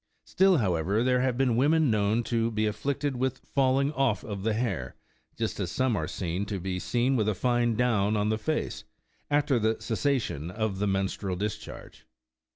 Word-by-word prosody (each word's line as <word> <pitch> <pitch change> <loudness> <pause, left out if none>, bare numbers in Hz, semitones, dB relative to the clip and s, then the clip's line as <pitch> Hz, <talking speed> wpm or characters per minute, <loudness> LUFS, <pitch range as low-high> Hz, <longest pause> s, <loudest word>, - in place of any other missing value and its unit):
Still 190 -1 +4
however, 95 - +1
there 125 0 +2
have 130 -2 0
been 130 -3 +2
women 150 +2 +3
known 105 +2 +1
to 115 -1 0
be 110 -1 0
afflicted 140 +5 -2
with 130 +1 -1
falling 135 +1 +1
off 130 -8 +1
of 100 -3 -5
the 110 +1 0
hair, 115 -7 -2 0.4
just 115 -2 -2
as 95 -4 -2
some 125 +3 +1
are 80 -4 -2
to 95 +3 -3
be 90 0 -3
seen 125 +7 +1
with 110 -3 +1
a 105 - 0
fine 120 +2 +1
down 110 -3 +2
on 105 +1 +1
the 110 0 0
face, 155 +7 -2 0.5
after 145 -3 +2
the 110 0 0
cessation 115 - -1
of 105 0 -2
the 105 - +1
menstrual 95 -1 -1
discharge. 105 +3 -6
115 Hz, 175 wpm, -28 LUFS, 100-130 Hz, 0.5 s, Still